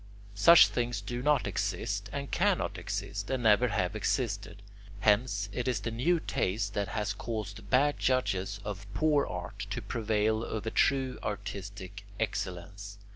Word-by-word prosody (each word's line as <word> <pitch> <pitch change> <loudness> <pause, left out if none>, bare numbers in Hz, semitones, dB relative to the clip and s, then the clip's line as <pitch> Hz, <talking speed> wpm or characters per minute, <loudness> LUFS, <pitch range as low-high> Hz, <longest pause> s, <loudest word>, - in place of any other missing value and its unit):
Such 160 +12 +8
things 120 -2 -1
do 120 +5 -4
not 145 -1 +3
exist 100 +1 -2
and 140 0 -5
cannot - - +1
exist 100 -1 -4
and 130 -2 -1
never 110 +3 +5
have 95 -2 -1
existed. 105 -3 -2 0.4
Hence, 105 -1 +2
it 125 +4 -3
is 125 - 0
the 115 - -3
new 165 +10 +2
taste 100 - -1
that 100 -1 -1
has 105 +1 -2
caused 110 -1 -5
bad 145 +3 +3
judges 105 -6 0
of 100 -1 -6
poor 150 +2 +3
art 90 0 -6
to - - -3
prevail 110 0 0
over 110 -1 -3
true 135 -2 +2
artistic 100 0 -6 0.2
excellence. 100 -1 -4
105 Hz, 145 wpm, -30 LUFS, 100-120 Hz, 0.4 s, Such